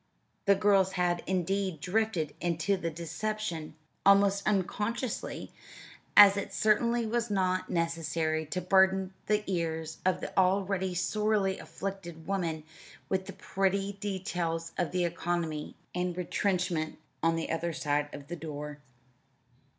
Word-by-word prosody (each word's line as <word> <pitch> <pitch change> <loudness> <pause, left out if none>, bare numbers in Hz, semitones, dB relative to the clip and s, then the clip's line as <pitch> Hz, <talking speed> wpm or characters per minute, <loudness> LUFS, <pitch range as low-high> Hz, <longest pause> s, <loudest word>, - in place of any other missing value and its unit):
The 200 -1 +6
girls 195 -1 +3
had, 175 -1 +1
indeed, 190 -1 0
drifted 180 -4 0
into 175 +3 +1
the 170 -3 -2
deception 170 0 -4 0.3
almost 200 0 +5
unconsciously, 210 +4 -1 0.7
as 200 -1 +10
it 200 - -4
certainly 235 +2 +3
was 235 +1 -1
not 185 -2 0
necessary 165 -2 0
to 180 +4 -2
burden 190 +1 +3
the 210 0 +2
ears 160 -3 -2
of 185 0 +2
the - - -6
already 190 0 +2
sorely 210 +1 +1
afflicted 175 -4 -6
woman 170 -5 -1 0.5
with 190 0 0
the - - -6
petty 195 +1 -1
details 175 -4 -2
of 175 -3 0
the 180 -1 +1
economy 170 -3 -2 0.2
and 180 0 -1
retrenchment 180 -3 0 0.2
on 165 0 +3
the 165 - -2
other 170 +1 -1
side 145 -2 0
of 140 -1 -9
her 175 - -4
door. 150 -2 -6
185 Hz, 125 wpm, -30 LUFS, 165-200 Hz, 0.7 s, as